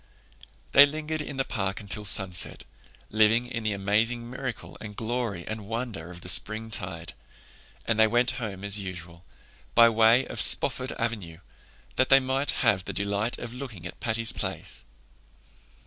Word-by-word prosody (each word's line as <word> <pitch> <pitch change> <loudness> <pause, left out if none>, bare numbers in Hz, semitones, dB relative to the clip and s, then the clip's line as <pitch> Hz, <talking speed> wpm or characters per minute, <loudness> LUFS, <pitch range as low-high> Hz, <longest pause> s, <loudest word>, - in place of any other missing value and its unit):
They 140 +1 +9
lingered 155 +1 -4
in 140 -2 -7
the 135 - 0
park 95 -4 -2
until 105 0 -3
sunset, 95 -2 +2 0.5
living 110 +3 +4
in 120 -1 -5
the 110 -1 -1
amazing 110 +4 0
miracle 130 0 -6
and 105 -1 -8
glory 110 -6 -3
and 110 -2 -6
wonder 115 -7 -5
of 90 -1 -10
the - - -10
springtide; 95 -5 0 0.7
and 110 -1 0
they 110 - +6
went 120 +2 +2
home 100 -4 -5
as 100 0 +1
usual, 85 -3 -8 0.5
by 115 0 +8
way 115 +3 +4
of - - -4
Spofford 130 0 +2
Avenue, 105 -9 -4 0.6
that 130 - +3
they 135 - +8
might 135 +2 -1 0.2
have 95 -3 +3
the - - -5
delight 100 +3 +1
of 120 0 -7
looking 120 -9 -8
at 85 - -8
Patty's 115 0 +1
Place. - - -3
110 Hz, 155 wpm, -27 LUFS, 100-120 Hz, 0.7 s, They